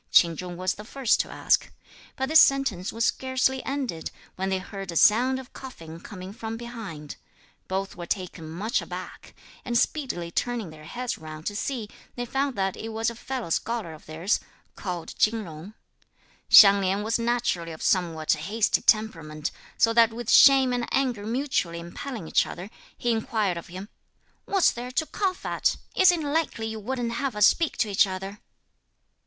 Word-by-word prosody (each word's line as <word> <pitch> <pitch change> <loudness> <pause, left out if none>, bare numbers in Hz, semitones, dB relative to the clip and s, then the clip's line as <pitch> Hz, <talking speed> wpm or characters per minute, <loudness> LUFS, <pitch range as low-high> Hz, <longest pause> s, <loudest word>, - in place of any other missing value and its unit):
Ch'in 170 -2 +5
Chung 180 +1 -6
was 185 +1 0
the 210 - -10
first 255 +1 +1
to - - -1
ask. - - +1 0.4
But 265 0 -2
this 315 0 +8
sentence 265 -10 +2
was 230 +1 0
scarcely 260 0 0
ended, 265 - -3 0.3
when 190 +1 -2
they 190 - +1
heard 195 0 -7
a - - -8
sound 245 +9 +5
of 260 - -12
coughing 165 -11 -10
coming 185 +1 -9
from 225 +1 -5
behind. 225 -11 -8 0.5
Both 190 +1 -3
were 175 -1 -7
taken 180 -5 -4
much 205 - -1
aback, - - -9 0.3
and, 240 -1 0
speedily 235 - -1
turning 235 -4 -2
their 155 -1 -13
heads 245 +8 -4
round 155 0 -9
to 205 - -3
see, 230 0 -3 0.3
they 245 - -3
found 270 +2 -1
that 195 -1 -1
it 225 - -6
was 225 +1 -1
a - - -10
fellow 245 -6 -5
scholar 225 -4 -2
of 155 - -15
theirs, 165 +7 0 0.4
called 180 -4 -5
Chin 220 0 +2
Jung. 170 +4 -10 0.7
Hsiang 200 -2 +9
Lin 195 +2 0
was 225 +2 0
naturally 230 -8 0
of 160 - -8
somewhat 165 -4 +1
hasty 200 +8 0
temperament, 165 -9 +1 0.3
so 230 - +4
that 230 -1 +5
with 235 0 -3
shame 265 -2 +7
and 245 -1 -2
anger 245 -6 0
mutually 230 -9 -1
impelling 175 - -7
each - - +2
other, 185 +5 -8 0.3
he 240 - 0
inquired 220 -4 0
of 170 - -7
him, 185 +3 -8 0.6
"What's 390 -3 +3
there 245 +1 -6
to 290 +5 0
cough 375 +2 -2
at? - - 0 0.2
Is 375 -1 +7
it 340 -3 -2
likely 290 -6 -1
you 220 0 -4
wouldn't 240 +2 -3
have 250 0 -2
us 210 -1 +5
speak 330 +5 +2
to 220 - +1
each 195 - +4
other?" 195 +2 -6
220 Hz, 180 wpm, -26 LUFS, 180-245 Hz, 0.7 s, Hsiang